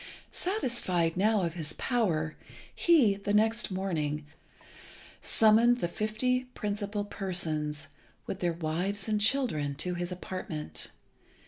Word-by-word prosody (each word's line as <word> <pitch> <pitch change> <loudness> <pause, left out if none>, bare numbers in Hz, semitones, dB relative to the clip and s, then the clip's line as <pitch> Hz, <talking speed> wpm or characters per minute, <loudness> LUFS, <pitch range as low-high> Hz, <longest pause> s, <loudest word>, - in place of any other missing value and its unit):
Satisfied 235 - 0
now 210 +2 +3
of 170 -2 -1
his 155 -3 -4
power, 165 -11 0 0.4
he, 300 - +5
the 205 +1 -1
next 225 +2 +3
morning, 160 -6 -2 1.0
summoned 230 +3 +5
the 175 - 0
fifty 220 +7 0
principal 205 0 -2
persons, 155 -7 -2 0.4
with 190 - -4
their 175 -1 +1
wives 175 +5 -2
and 210 -1 +1
children, 205 - +2
to 180 +5 -1
his 175 +1 -3
apartment. 80 - -5
190 Hz, 115 wpm, -30 LUFS, 165-220 Hz, 1.0 s, he